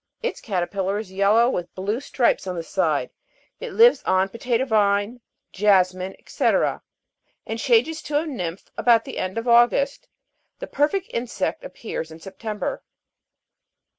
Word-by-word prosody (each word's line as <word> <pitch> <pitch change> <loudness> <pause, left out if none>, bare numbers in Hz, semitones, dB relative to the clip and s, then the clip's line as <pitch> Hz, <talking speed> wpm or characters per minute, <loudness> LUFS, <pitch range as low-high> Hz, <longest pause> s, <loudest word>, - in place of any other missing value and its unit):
Its 485 - -3
caterpillar 195 0 -2
is 210 -3 -6
yellow 200 +5 +4
with 175 -9 -3
blue 205 +5 -2
stripes 250 -7 0
on 180 - -3
the 170 - -4
side; - - 0 0.5
it - - -6
lives 470 +2 +6
on 185 0 +2
the 195 - -13
potatoe 245 +1 0
vine, 210 0 +1 0.3
jasmin, 185 -2 +2
&c., - - -5 1.0
and 225 +1 -4
changes 265 +7 +2
to 290 - -1
a 310 - 0
nymph, 185 - -5
about 230 -1 +4
the - - -6
end 185 +3 -3
of 230 +2 -3
August; 240 +4 +3 0.5
the - - -6
perfect 310 +7 0
insect 240 - -3
appears 225 - -6
in 160 - -11
September. 210 - -5
220 Hz, 145 wpm, -23 LUFS, 190-250 Hz, 1.0 s, lives